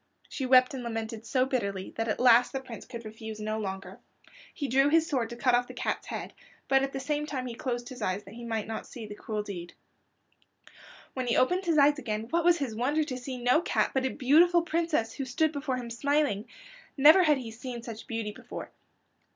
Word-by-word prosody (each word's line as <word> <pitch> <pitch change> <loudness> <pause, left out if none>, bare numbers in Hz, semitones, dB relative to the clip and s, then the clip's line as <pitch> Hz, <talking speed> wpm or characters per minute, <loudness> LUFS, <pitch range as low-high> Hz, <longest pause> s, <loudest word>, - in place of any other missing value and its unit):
She 265 - -4
wept 255 +1 +6
and 265 - -4
lamented 225 -1 -5
so 255 -1 +2
bitterly 200 -8 -2
that 225 0 -2
at 215 - -1
last 245 -1 +5
the 270 - -1
Prince 255 -4 -10
could 235 -2 -8
refuse 220 0 -8
no 215 +1 -2
longer. 195 0 -6 0.5
He 285 - -4
drew 270 +3 +4
his 325 +1 +4
sword 255 -8 -1
to 235 - -7
cut 250 +1 +2
off 245 0 +3
the - - -10
cat's - - -2
head, - - -5 0.3
but 270 0 +4
at 270 0 -1
the 270 - -4
same 295 +2 -2
time 260 -4 -3
he 245 - -5
closed 240 0 -4
his 255 -3 -9
eyes 190 0 -1
that 195 - -13
he 240 +1 -9
might 225 -2 -2
not 220 0 -5
see 235 -3 -8
the 210 - -8
cruel 210 0 -4
deed. 175 -4 -7 1.4
When 255 -2 -3
he 235 - +2
opened 360 +9 +2
his 330 -2 +2
eyes 290 +1 +5
again 215 -5 -3
what 340 0 +2
was 345 0 +5
his 275 -7 -3
wonder 275 +8 +1
to 275 -4 -5
see 255 +1 -6
no 250 +6 +3
cat, - - +1
but 265 - +1
a 265 - +1
beautiful 325 +7 +4
princess 330 -9 0
who 275 - -4
stood 310 +5 +1
before 280 -3 -2
him 240 -2 -6
smiling. 280 -4 0 0.5
Never 310 +7 +8
had 305 -5 +4
he 240 -4 -6
seen 240 +1 -7
such 230 -2 -8
beauty 225 -4 -3
before. - - -9
250 Hz, 225 wpm, -29 LUFS, 225-285 Hz, 1.4 s, Never